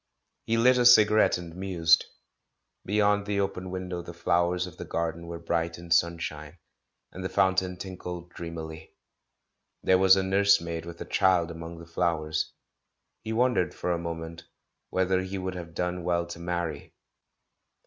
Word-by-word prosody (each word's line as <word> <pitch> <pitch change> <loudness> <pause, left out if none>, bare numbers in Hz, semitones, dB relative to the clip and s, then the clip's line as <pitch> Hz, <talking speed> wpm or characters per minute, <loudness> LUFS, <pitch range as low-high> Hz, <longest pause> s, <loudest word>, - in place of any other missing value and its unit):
He 115 - +2
lit 125 +2 +5
a - - +4
cigarettCi 110 -3 +6
and 85 -1 -9
mused. 85 -4 +3 0.8
Beyond 105 0 +2
the 100 -1 0
open 95 -2 -2
window 90 -1 -4
the 85 0 -10
flowers 85 +1 +1
of 90 -3 -11
the - - -6
garden 85 0 -3
were 85 0 -5
bright 85 0 -2
in 85 0 -11
sunshine, 85 -2 0 0.5
and 95 - -8
the 95 - -2
fountain 95 0 +1
tinkled 90 -2 -7
dreamily. 80 -2 -8 0.9
There 95 0 +4
was 95 0 +7
a 95 - +1
nurse 100 +1 +4
maid 85 0 -5
with 85 0 -9
a - - -4
child 90 -3 +2
among 85 0 -8
the 85 - -10
flowers; 80 -2 -1 0.7
he 110 - -5
won 125 +3 +3
dered, 90 - 0
for 90 - -2
a 85 - 0
moment, 85 0 -6 0.4
whether 95 0 +1
he 95 +1 -5
would 95 0 -3
have 85 -2 -8
done 90 0 -2
well 85 0 0
to 85 0 -9
marry. 85 -4 -4
90 Hz, 165 wpm, -27 LUFS, 85-95 Hz, 0.9 s, was